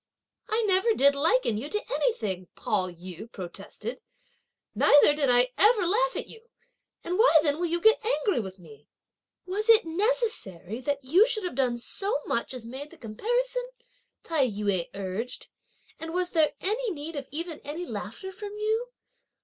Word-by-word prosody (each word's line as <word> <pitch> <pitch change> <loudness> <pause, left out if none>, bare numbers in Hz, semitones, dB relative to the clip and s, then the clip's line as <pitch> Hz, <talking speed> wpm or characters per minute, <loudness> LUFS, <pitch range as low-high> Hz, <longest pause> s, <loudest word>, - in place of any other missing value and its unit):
"I 445 +2 +1
never 410 +2 +3
did 280 +1 +5
liken 285 - +2
you 280 +6 -5
to 420 +5 -3
anything," 195 - -1
Pao 190 -3 -1
yü 180 +5 -10
protested, 200 +6 -7 0.7
"neither 290 0 +6
did 290 -3 +1
I 245 +1 +4
ever 415 0 +5
laugh - - +2
at - - -3
you! 455 +1 -13 0.6
and 360 +3 -2
why 445 -8 +7
then 295 0 +1
will 350 - 0
you 340 +1 0
get 440 +6 +4
angry 430 - +1
with 190 -3 -6
me?" 150 -5 -16 0.6
"Was 410 +5 -2
it 450 -3 +7
necessary 325 - -1
that 280 +1 -2
you 360 - +5
should 435 -4 +1
have 360 - -3
done 250 -2 +1
so 390 - -2
much 235 - -1
as 245 -3 -7
made 265 +5 -7
the - - -16
comparison," - - -2 0.5
Tai 310 -6 +1
yü 200 -5 -1
urged, 200 +6 -5 0.5
"and 325 +1 -6
was 360 0 0
there 310 -3 +3
any 450 +5 -1
need 320 -2 -6
of 275 -2 -5
even 325 +2 -5
any 315 +5 -6
laughter 380 +2 -6
from 410 +2 -8
you? 440 +3 0
320 Hz, 165 wpm, -27 LUFS, -, 0.7 s, why